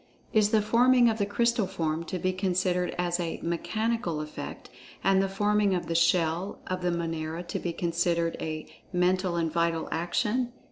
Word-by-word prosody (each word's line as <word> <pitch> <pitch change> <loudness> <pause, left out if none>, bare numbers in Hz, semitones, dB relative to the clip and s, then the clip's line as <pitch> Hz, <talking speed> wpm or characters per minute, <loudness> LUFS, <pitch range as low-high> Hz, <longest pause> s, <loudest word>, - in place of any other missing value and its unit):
Is 215 -1 +4
the 215 -1 +3
forming 240 +2 +5
of 220 - -4
the 200 - +1
Crystal 235 0 +1
form 160 -1 -2
to 185 - -3
be 185 +1 0
considered 185 -1 0
as 175 0 0
a 170 -2 -3
"mechanical 180 +1 -1
effect," 150 -1 -7 0.4
and 195 0 +4
the 195 - 0
forming 205 0 +2
of 175 - -2
the 165 - -2
"shell" 170 +2 +2
of 185 0 -3
the 180 - +1
Monera 165 -1 -3
to - - -3
be 175 - -2
considered 170 0 0
a 155 -1 -4 0.3
"mental 180 0 +1
and 165 -2 0
vital 170 -1 0
action?" 210 +9 0
180 Hz, 175 wpm, -28 LUFS, 170-205 Hz, 0.4 s, forming